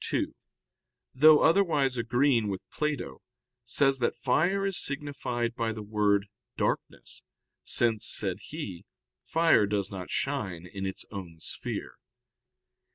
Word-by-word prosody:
ii), - - 0 0.8
though 150 +3 +7
otherwise 160 -7 +3
agreeing 120 0 +2
with 95 -2 -4
Plato, 150 -2 -3 0.4
says 135 +2 +2
that 120 - +1
fire 175 +11 +2
is 195 -2 -1
signified 140 -4 -3
by 115 -1 -1
the 110 -1 -6
word 105 -1 +2 0.3
darkness, - - -3 0.4
since, 115 -3 +1
said 95 -2 -1
he, 125 - -6 0.4
fire 165 -10 +4
does 100 -1 -1
not 95 -2 -6
shine 95 -12 -2
in 95 +2 -5
its 95 - -5
own 90 -5 -8
sphere. - - -6
120 Hz, 120 wpm, -29 LUFS, 100-145 Hz, 0.8 s, though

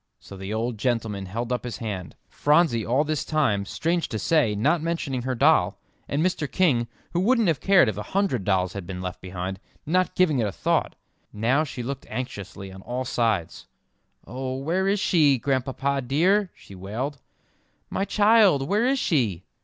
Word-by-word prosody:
So 100 - -12
the 95 +1 -6
old 110 +1 -2
gentleman 110 -5 -1
held 115 +6 -4
up 125 - -2
his 120 -4 -5
hand; 100 -6 -5
Phronsie 150 -6 +2
all 130 +7 +2
this 155 -1 -2
time, 125 -11 +1
strange 170 - -1
to 110 - -3
say, 115 -1 +2
not 150 +11 +2
mentioning 160 -6 -2
her 130 +1 -2
doll, 135 - +3 0.3
and 150 +4 0
Mr. 160 -6 -1
King, 130 -11 +2 0.3
who 175 - +1
wouldn't 230 +2 +3
have 160 -6 +1
cared 195 -8 +5
if 105 -3 -2
a - - -3 0.2
hundred 185 - +1
dolls 95 -2 +1
had 100 -4 -6
been 90 -1 -5
left 90 0 -6
behind, 95 +1 -5 0.3
not 185 +4 +1
giving 155 -7 +3
it 110 - +1
a - - -3
thought. - - 0 0.4
Now 120 +8 +1
she 130 -5 -6
looked 135 +2 -5
anxiously 100 -5 -6
on 95 - -11
all 125 +5 -4
sides. 110 -9 -1 0.6
"Oh, 130 +1 -4
where 170 +8 0
is 200 +1 +2
she, 155 -8 +4
Grandpapa 135 +2 -1
dear?" 180 +10 +2
she - - -15
wailed, 115 +10 -5 0.7
"my - - -1
child; 205 -9 +4
where 210 +7 +2
is 270 +1 +2
she?" 115 - 0
130 Hz, 180 wpm, -25 LUFS, 105-160 Hz, 0.7 s, cared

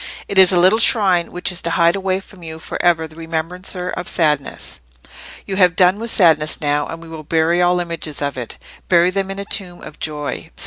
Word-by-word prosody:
"It 195 - +1
is 190 -1 +8
a 180 - +2
little 190 +5 +5
shrine, 190 -7 +3
which 180 +1 -1
is 180 - -1
to 170 - -3
hide 170 +1 +2
away 190 -1 -1
from 190 -1 -17
you 160 -1 -8
for 160 - -6
ever 165 -2 +2
that 155 - -17
remembrancer 175 +3 -4
of 180 - -6
sadness. 150 - -1 0.7
You 190 - -4
have 180 -2 +4
done 185 +2 +3
with 230 +1 -3
sadness 160 -7 +3
now; 145 -1 -1
and 165 0 -8
we - - -12
will 160 -1 -9
bury 160 +3 +1
all 180 0 +2
images 165 -4 -5
of 140 -1 -3
it—bury 170 +8 -1
them 195 0 -2
in 195 - -6
a 200 - -6
tomb 185 -4 -1
of 150 - -12
joy. 150 -2 -5
175 Hz, 215 wpm, -18 LUFS, 160-185 Hz, 0.7 s, is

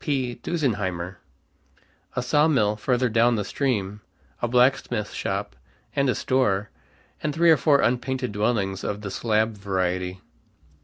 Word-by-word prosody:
P. 130 -5 -1
Dusenheimer," 95 - -2 1.0
a 125 - -1
sawmill 135 -6 +3
further 125 +3 +1
down 115 +1 +3
the 105 -2 -2
stream, 105 -3 -2 0.4
a 120 - +1
blacksmith 125 -3 +2
shop, - - -3 0.4
and 140 -1 +2
a - - +1
store, 105 -6 +1 0.5
and 150 -1 -2
three 170 0 +5
or 160 - +6
four 140 +1 +4
unpainted 125 0 0
dwellings 105 -2 -1
of 105 0 -3
the 100 -2 -5
slab 110 0 0
variety. 95 -2 -2
115 Hz, 135 wpm, -24 LUFS, 100-130 Hz, 1.0 s, or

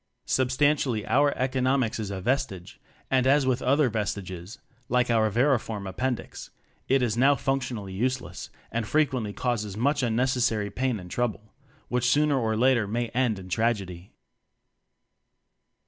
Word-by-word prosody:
Sub 130 -1 +1
stantially 130 -5 +1
our 145 +1 +3
"Economics" 130 -2 0
is 105 -2 -3
a 100 -1 -4
ves 130 +6 +1
tige, 90 -2 -11 0.3
and 130 -1 +3
as 140 0 +4
with 130 -1 +1
other 140 +2 +3
vestiges 100 -2 -4 0.3
like 125 0 +2
our 110 -1 +3
vermiform 115 -4 0
appendix 125 +7 -4 0.4
it 135 -1 +3
is 110 -3 0
now 135 +4 +4
functionally 125 -8 -2
useless, 125 -3 -3 0.2
and 115 -1 -2
frequently 135 -8 +1
causes 105 -3 -2
much 140 +6 +1
unnecessary 120 -3 +1
pain 125 -1 -1
and 90 -1 -11
trouble; 110 -3 -3 0.3
which 125 0 +1
sooner 145 0 +3
or 110 -2 0
later 120 -3 +3
may 120 +3 -2
end 120 -3 0
in 95 -1 -9
tragedy. 95 -3 -2
120 Hz, 145 wpm, -26 LUFS, 105-130 Hz, 0.4 s, as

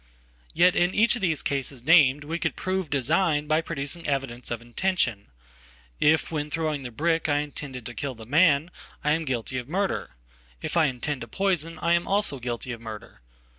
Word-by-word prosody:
Yet 180 +1 +5
in 175 +1 +2
each 230 +3 +4
of 240 - -5
these 165 -6 +1
cases 135 -2 -2
named 150 -2 +5
we 165 +3 -3
could - - -1
prove 185 -3 -2
design 150 +3 +1
byproducing 155 0 -2
evidence 135 -4 -2
of 120 - -3
intention. 120 - -1 0.7
If 155 +2 +3
when 150 -2 -2
throwing 155 -2 -1
the 125 - -6
brick 165 +7 0
Iintended 145 -4 -2
to 120 - -6
kill 135 +1 -4
the 110 -1 -11
man, 155 +4 +4 0.3
I 150 - +2
am 160 +1 +1
guilty 130 -1 -2
of 125 +2 -9
murder. 195 +3 -2 0.4
If - - -5
I 165 -2 +5
intend 135 +1 -2
topoison, 175 -4 -1
I 170 - +3
am 170 0 +1
also 200 -8 +1
guilty 120 +1 -4
of 115 -1 -7
murder. 110 -2 -9
150 Hz, 175 wpm, -26 LUFS, 130-170 Hz, 0.7 s, Yet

